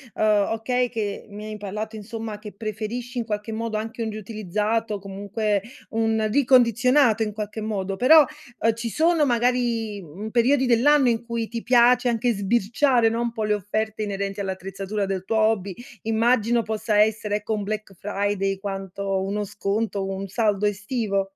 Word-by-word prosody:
ehm, 210 -2 +3
okay 245 +3 0
che 210 -4 -4
mi 210 +1 -9
hai 215 0 -6
parlato, 210 +2 -5
insomma, 220 0 -6
che 210 -1 -9
preferisci 225 +4 -5
in 235 - -1
qualche 210 0 -4
modo 225 0 -3
anche 225 +2 -4
un 225 - -1
riutilizzato, 215 +1 -2
comunque 200 +1 -2 0.3
un 220 -1 +1
ricondizionato 250 -2 +4
in 210 -1 -1
qualche 215 +1 -5
modo, 195 -3 -3
però, 305 +7 +8 0.4
ehm, 225 0 +3
ci 230 0 -4
sono 320 +4 +3
magari, 240 -4 0
mhmm, 185 +6 -8
periodi 255 +4 +3
dell'anno 260 +3 +5
in 230 0 -1
cui 230 -1 -3
ti 230 -1 -5
piace 245 +1 +5
anche 240 +1 +1
sbirciare, 235 +4 +2
no, 230 - -2
un 235 0 -1
po' 220 -2 -3
le 210 0 +2
offerte 215 +2 -2
inerenti 200 -1 -3
all'attrezzatura 195 +1 -3
del 190 -1 -3
tuo 225 - -1
hobby, 215 -4 +1 0.3
immagino 230 +1 +2
possa 215 0 -1
essere 215 -1 +1
ecco 210 +1 -2
un 210 -1 -2
Black 210 -1 -4
Friday 200 -1 0
quanto 195 -1 -3
uno 205 +2 -2
sconto, 205 +1 -2
o 195 0 -2
un 195 +1 -5
saldo 210 0 +1
estivo. 205 -1 -1
215 Hz, 165 wpm, -24 LUFS, 205-235 Hz, 0.4 s, però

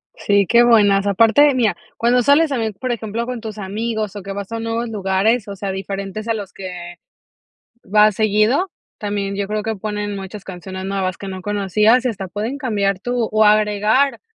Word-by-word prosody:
Sí, 200 -1 +2
que 235 +5 +5
buenas, 205 -4 +4
aparte 230 +8 +5
mira, 230 -4 +2 0.2
cuando 245 +2 +3
sales 290 +5 +4
también, 225 -5 -1
por 255 +6 -4
ejemplo, 230 0 -3
con 250 -1 -5
tus 215 -1 -7
amigos 215 +1 -3
o 205 - -6
que 195 0 -6
vas 200 +1 -6
a 230 - -3
nuevos 230 +1 -3
lugares, 205 +2 0
o 200 - -6
sea, 195 0 -4
diferentes 195 +2 -5
a 230 - +1
los 205 -3 -6
que 175 -2 -8 0.9
vas 210 +1 +4
seguido, 220 - +2 0.3
también 200 -1 -3
yo 200 -1 -2
creo 210 +1 -2
que 220 0 -3
ponen 210 0 -4
muchas 195 +1 -8
canciones 185 0 -7
nuevas 190 -2 -2
que 195 - -8
no 185 -1 -6
conocías, 210 +5 +2
y - - +2
hasta 195 -4 -5
pueden 220 +9 -4
cambiar 200 -7 0
tú 245 +1 -2
o 215 0 +3
agregar, 210 +5 +3
210 Hz, 190 wpm, -19 LUFS, 195-230 Hz, 0.9 s, que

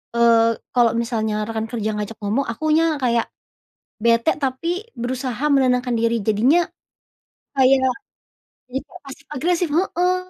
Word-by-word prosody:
eee, 230 -1 +4 0.2
kalo 240 -2 +4
misalnya 220 -2 -1
rekan 225 0 -3
kerja 220 -3 -2
ngajak 210 +1 -5
ngomong 220 +7 0
akunya 310 +6 +1
kayak, 235 -2 +1 0.8
bete 235 +5 +3
tapi 335 +8 -2 0.2
berusaha 255 +1 -3
menenangkan 250 -3 +2
diri 230 0 +1
jadinya, 250 - +3 0.9
kayak, 265 0 +4 0.8
jadi 260 +2 -4
kayak 360 - -14
pasif 275 +1 -11
agresif 345 +4 0
heeh, 360 +2 +1
250 Hz, 120 wpm, -21 LUFS, 230-290 Hz, 0.9 s, eee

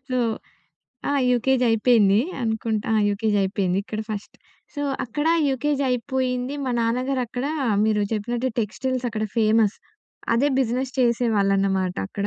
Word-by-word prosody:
So 255 0 0 0.9
ఆ! - - +1 0.2
UKG 250 +1 +2
అయిపోయింది 220 -3 +4 0.2
అనుకుంటా. 220 -1 -1
ఆ! - - +3
యూకేజయిపోయింది. 200 -3 0
ఇక్కడ 215 +1 -5
ఫస్ట్. 210 -1 -6 0.4
సో, 290 - -3 0.2
అక్కడా 295 +7 0 0.2
యూకేజయిపోయింది. 260 -1 -1
మా 260 - -1
నాన్నగారు 255 +3 0
అక్కడా 250 +5 -3 0.3
మీరు 215 -1 +2
చెప్పినట్టు 240 +4 -1
టెక్స్‌టైల్సక్కడ 240 0 -2
ఫేమస్. 220 -1 +3 0.6
అదే 265 +5 +3
బిజినెస్ 255 +1 0
చేసేవాళ్ళనమాట 195 -6 +1
అక్కడ. 200 - -3
230 Hz, 115 wpm, -23 LUFS, 210-255 Hz, 0.9 s, అయిపోయింది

